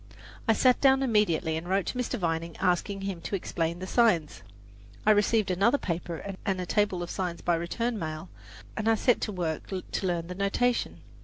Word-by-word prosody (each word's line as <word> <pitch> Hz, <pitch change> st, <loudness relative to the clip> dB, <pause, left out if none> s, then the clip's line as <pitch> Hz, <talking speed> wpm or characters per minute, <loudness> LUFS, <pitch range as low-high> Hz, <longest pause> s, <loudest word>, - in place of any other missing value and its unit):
I 225 Hz, -, +6 dB
sat 250 Hz, +3 st, +3 dB
down 270 Hz, -1 st, +5 dB
immediately 210 Hz, -10 st, +2 dB
and 170 Hz, +2 st, -6 dB
wrote 195 Hz, 0 st, +1 dB
to -, -, -3 dB
Mr. 250 Hz, 0 st, -1 dB
Vining, 165 Hz, -3 st, -2 dB
asking 195 Hz, +2 st, 0 dB
him 195 Hz, -3 st, -4 dB
to 195 Hz, -, -3 dB
explain 170 Hz, -2 st, -2 dB
the 185 Hz, -, -6 dB
signs. 190 Hz, -, +2 dB, 0.6 s
I 215 Hz, -, +6 dB
received 210 Hz, -1 st, +3 dB
another 200 Hz, +9 st, +3 dB
paper 175 Hz, -, -4 dB
and 195 Hz, -3 st, -1 dB
a 180 Hz, -, -2 dB
table 195 Hz, -2 st, +1 dB
of 175 Hz, -, -6 dB
signs 180 Hz, -3 st, -3 dB
by 175 Hz, -, +1 dB
return 215 Hz, +8 st, -1 dB
mail, 155 Hz, +1 st, -5 dB, 0.5 s
and 215 Hz, +1 st, 0 dB
I 225 Hz, -, +5 dB
set 245 Hz, +2 st, +2 dB
to 215 Hz, -, -2 dB
work 170 Hz, -5 st, -3 dB
to 190 Hz, 0 st, -3 dB
learn 170 Hz, -2 st, -1 dB
the 180 Hz, -, -6 dB
notation. 200 Hz, +6 st, 0 dB
190 Hz, 190 wpm, -28 LUFS, 170-215 Hz, 0.6 s, I